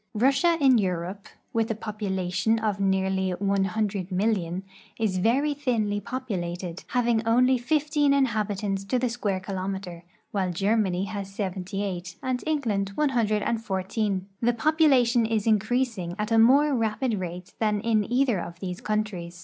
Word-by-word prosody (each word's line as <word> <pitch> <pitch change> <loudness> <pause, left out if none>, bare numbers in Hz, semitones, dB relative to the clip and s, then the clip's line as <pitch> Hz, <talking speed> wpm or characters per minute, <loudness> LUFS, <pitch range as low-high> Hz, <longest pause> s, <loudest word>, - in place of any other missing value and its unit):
Russia 275 +9 +3
in 265 -5 +5
Europe, 185 +1 -3 0.3
with 225 -1 +1
a 225 - -1
population 205 -1 -1
of 215 -3 -1
nearly 190 -1 +1
100,000,000, 195 -1 -1 0.3
is 205 -5 0
very 270 +9 +2
thinly 230 -8 0
populated, 185 -8 -4
having 235 -2 +1
only 250 +3 +4
fifteen 295 +2 +1
inhabitants 210 -7 0
to 225 +6 0
the 250 0 0
square 210 -5 -2
kilometer, 190 -2 -5 0.3
while 190 -3 0
Germany 195 0 +1
has 200 -1 -5
seventy 195 0 -3
eight 180 -3 -5
and 255 -1 -1
England 215 -11 0
one 300 -1 +2
hundred 215 -5 +1
and 230 -1 -1
fourteen. 190 0 -1 0.2
The 240 +1 +3
population 255 -5 +3
is 220 -2 0
increasing 220 -4 0
at 210 +1 -3
a 225 - +5
more 280 +6 +5
rapid 225 -1 0
rate 180 0 -6
than 210 -2 +1
in 220 -1 +1
either 245 -5 +2
of 170 0 -7
these 180 -1 -5
countries. 195 -5 -3
210 Hz, 145 wpm, -26 LUFS, 190-240 Hz, 0.3 s, in